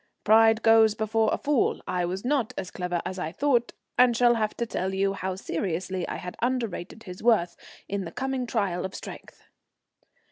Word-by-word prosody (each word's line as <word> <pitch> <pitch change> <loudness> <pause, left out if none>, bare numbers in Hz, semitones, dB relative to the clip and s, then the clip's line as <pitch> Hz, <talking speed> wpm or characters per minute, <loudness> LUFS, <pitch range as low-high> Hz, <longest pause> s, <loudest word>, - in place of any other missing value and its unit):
Pride 225 +1 +5
goes 225 -1 +5
before 220 0 +1
a - - +1
fall. 290 -4 +1
I 180 -1 0
was 185 +5 -4
not 265 -4 0
as 185 -1 -5
clever 180 -1 -3
as 185 +1 -4
I 160 -3 -3
thought, 245 - +1 0.3
and 245 -2 +5
shall 240 0 +5
have 215 -2 -1
to 235 - -1
tell 190 -4 -3
you 195 0 +1
how 190 -1 -3
seriously 185 0 -3
I - - -4
had 180 0 -7
underrated 230 -4 -2
his 180 -1 -9
worth 215 -7 +2 0.3
in 200 0 -2
the 165 - -7
coming 265 +1 -3
trial 200 -6 -1
of 190 +1 -5
strength. - - -10
215 Hz, 185 wpm, -26 LUFS, 185-235 Hz, 0.3 s, Pride